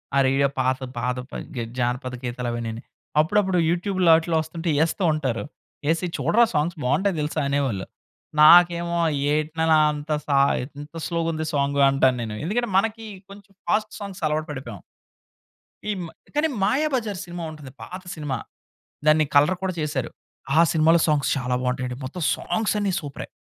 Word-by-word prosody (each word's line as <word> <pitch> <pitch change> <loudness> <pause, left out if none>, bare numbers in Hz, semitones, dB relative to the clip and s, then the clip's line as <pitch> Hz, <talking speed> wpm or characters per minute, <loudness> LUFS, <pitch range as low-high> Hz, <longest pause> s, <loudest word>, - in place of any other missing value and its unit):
ఆ - - +3
రేడియో 135 +1 +3
పాడేసే 130 0 0
పాదపని 125 +1 -4
గే 120 - -2 0.2
జానపద 125 +1 -1
గీతాలవన్నీని. 120 -2 -4 0.4
అప్పుడప్పుడు 190 +3 +2
యూట్యూబ్‌లో 180 0 +1
ఆటిల్లో 160 0 +1
వస్తుంటే 165 +2 -5
ఎస్తూ 175 +4 -2
ఉంటారు. 130 -8 -2 0.5
"ఎసి, 165 +2 -1
చూడరా 170 - +4
సాంగ్స్ 160 +3 0
బావుంటాయి 190 +9 +1
తెలుసా!" 155 +1 -1
అనేవాళ్ళు. 130 -10 -1 0.6
నాకేమో, 170 +1 +6 0.3
"ఏటి 155 +1 0
నాన్న 160 0 +4 0.2
అంత 150 +1 -6 0.2
సా 140 - +2 0.4
ఇంత 150 +3 -12
స్లోగుంది 165 -2 -1
సాంగ్" 140 0 +1
అంటాను 130 -2 +3
నేను. 110 -2 -5
ఎందుకంటే 240 +5 -1
మనకి 225 +2 0 0.3
కొంచెం 200 0 -14 0.2
ఫాస్ట్ 215 0 +1
సాంగ్స్ 200 -1 -7
అలవాటు 155 +1 -1
పడిపోయాం. 120 - -7 1.1
ఈమ్ 190 -4 -2 0.3
కానీ 300 +2 +3 0.2
'మాయాబజార్' 255 - 0
సినిమా 175 -1 -7
ఉంటది. 150 -4 -11
పాత 185 +1 -8
సినిమా. 145 -5 -3 0.7
దాన్ని 155 0 +5
కలర్ 150 +6 +5
కూడా 185 -1 -1
చేశారు. 145 -5 -2 0.5
ఆ - - +8
సినిమాలో 165 +1 +4
సాంగ్స్ 150 -2 +1
చాలా 125 -2 -1
బావుంటయండి. 125 0 -2
మొత్తం 170 +7 -6
సాంగ్స్ 220 -1 -1
అన్ని 200 -2 0
సూపరే. 145 -3 -7
155 Hz, 145 wpm, -24 LUFS, 130-180 Hz, 1.1 s, ఆ